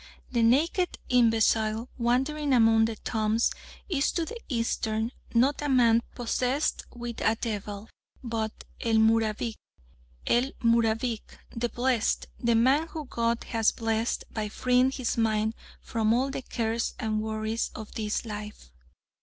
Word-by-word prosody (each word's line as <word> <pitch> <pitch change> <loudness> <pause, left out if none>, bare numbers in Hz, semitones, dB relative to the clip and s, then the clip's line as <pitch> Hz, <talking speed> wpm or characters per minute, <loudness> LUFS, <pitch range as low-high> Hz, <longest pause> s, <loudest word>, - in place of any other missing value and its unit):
The 240 -2 +1
naked 310 +10 +2
imbecile 225 -1 +3
wandering 270 +5 +1
among 225 -2 +5
the 225 0 -3
tombs 220 +1 0 0.4
is 300 -7 +1
to 335 - 0
the 470 +7 -7
Eastern 230 -2 -1 0.2
not 265 +6 +3
a 295 - -1
"man 235 -3 +5
possessed 250 +4 -1
with 240 -1 -6
a 220 - +3
devil," 210 -2 -5 0.4
but 225 -2 -3 0.2
"el 230 -1 +1
Mubarik." 220 0 +2 0.7
El 250 +3 +2
Mubarik! 230 0 +2 0.3
The 235 +1 -1
Blessed! 240 -1 0
The 235 -1 +2
man 265 +8 +3
whom 310 -4 -7
God 235 0 0
has 225 -2 +3
blessed 225 0 -1
by 215 -1 -3
freeing 250 +3 +3
his 255 -3 -2
mind 220 -1 +1 0.3
from 225 0 +1
all 265 +3 +1
the 270 - -4
cares 230 -2 -2
and 215 -2 -1
worries 220 +1 -2
of 220 -1 -8
this 215 +1 -2
life. 210 - -8
230 Hz, 135 wpm, -28 LUFS, 220-250 Hz, 0.7 s, among